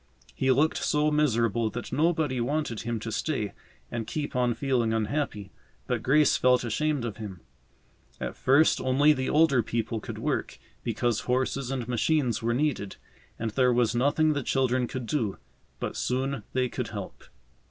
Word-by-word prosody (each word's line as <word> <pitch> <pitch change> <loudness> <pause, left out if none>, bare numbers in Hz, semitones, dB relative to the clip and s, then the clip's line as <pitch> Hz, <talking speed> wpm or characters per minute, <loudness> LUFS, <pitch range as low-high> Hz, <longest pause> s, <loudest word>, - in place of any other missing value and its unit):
He 135 - 0
looked 145 +5 +3
so 150 0 +2
miserable 115 -7 +2
that 120 +4 -6
nobody 150 -4 +1
wanted 135 -3 -1
him 115 -1 -3
to 115 - -4
stay 110 -6 -2 0.4
and 115 -2 -3
keep 145 +1 -4
on 125 -2 +2
feeling 125 -5 +1
unhappy, 110 -3 -2 0.3
but 120 -3 -1
Grace 145 +5 +4
felt 125 0 +3
ashamed 140 +3 0
of 110 -3 -5
him. 100 -6 -7 0.8
At - - -4
first 140 +5 +4
only 140 +4 +4
the 130 -2 -2
older 150 -5 +4
people 115 0 -2
could - - -7
work, - - -2 0.3
because 115 0 0
horses 130 +1 0
and 130 -4 -3
machines 125 -1 +1
were 115 +1 0
needed, 130 -8 -1 0.4
and 115 -1 -3
there 125 +2 +3
was 120 -1 +2
nothing 145 +5 +2
the 145 - -1
children 130 -1 +1
could 130 -1 -5
do. 110 -5 -1 0.4
But - - -4
soon 130 0 -1
they 130 -1 +1
could - - -4
help. - - -8
125 Hz, 165 wpm, -27 LUFS, 115-145 Hz, 0.8 s, Grace